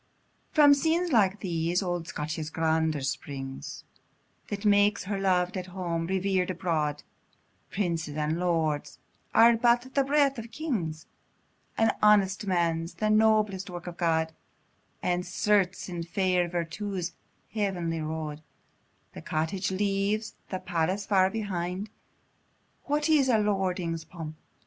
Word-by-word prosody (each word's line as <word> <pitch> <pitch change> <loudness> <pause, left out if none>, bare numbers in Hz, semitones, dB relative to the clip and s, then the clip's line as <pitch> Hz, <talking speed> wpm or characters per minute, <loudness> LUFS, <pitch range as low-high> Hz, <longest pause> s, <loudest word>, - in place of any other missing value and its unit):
From 295 -2 +7
scenes 325 +4 +1
like 205 -4 +3
these, 170 0 0
old 175 -2 -2
Scotia's 155 -2 -4
grandeur 160 -2 0
springs, 135 0 -5 0.6
That 205 +1 -5
makes 205 0 +4
her 195 0 -3
lov'd 180 -1 +1
at 180 0 -4
home, 175 -3 -3
rever'd 190 0 0
abroad: 160 -5 -1 0.7
Princes 165 -6 -2
and 155 +2 0
lords 160 -4 0 0.4
are 230 +1 +7
but 240 +2 +2
the 275 - +3
breath 275 -2 +2
of 230 +1 -8
kings, 190 - -3 0.7
"An 225 - +4
honest 205 -1 +4
man's 170 -2 0
the 215 0 0
noblest 215 -3 +3
work 175 -1 -7
of 175 -1 -7
God;" 160 -2 +1 0.7
And 180 0 +1
certes, 190 +1 +1
in 175 -2 -4
fair 180 +1 +1
virtue's 175 +1 -3 0.4
heavenly 180 -6 -1
road, 155 -1 -4 0.7
The - - -8
cottage 160 +4 -1
leaves 200 +2 0 0.2
the 185 - -2
palace 185 +3 -1
far 190 -2 +4
behind; 195 -1 -3 0.9
What 295 +2 +1
is 295 -4 +4
a 230 - +5
lordling's 185 -5 0
pomp? 160 -2 -8
185 Hz, 125 wpm, -28 LUFS, 165-210 Hz, 0.9 s, From